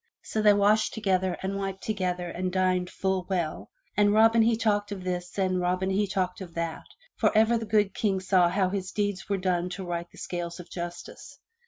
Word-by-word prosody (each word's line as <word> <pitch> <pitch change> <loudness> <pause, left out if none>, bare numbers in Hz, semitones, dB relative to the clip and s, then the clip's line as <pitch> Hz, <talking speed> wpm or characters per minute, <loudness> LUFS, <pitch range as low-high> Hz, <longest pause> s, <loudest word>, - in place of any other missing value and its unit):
So 220 - -2
they 210 -1 +6
washed 210 +2 +3
together 190 -4 0
and 195 +1 -2
wiped 195 -1 -4
together 180 -4 -2
and 180 +1 -3
dined 185 -1 +1
full 190 -1 -2
well, 175 -5 -2 0.3
and 205 0 +4
Robin 225 +2 +5
he 225 0 +3
talked 210 -2 0
of 190 -2 -5
this 180 0 -4
and 185 -2 +1
Robin 180 +2 0
he 200 +2 +1
talked 185 -1 -2
of 175 -3 -9
that, 165 -1 -4 0.3
and - - +4
ever 220 +2 +5
the 225 -1 -2
good 205 -2 +2
King 195 -3 0
saw 185 -2 +3
how 185 +1 +1
his 190 -1 -3
deeds 205 -2 -2
were 200 - +1
done 180 -1 0
to 195 - -5
right 175 0 -4
the - - -17
scales 170 -1 -5
of 180 - -11
justice. 175 -1 -7
190 Hz, 205 wpm, -27 LUFS, 180-205 Hz, 0.3 s, they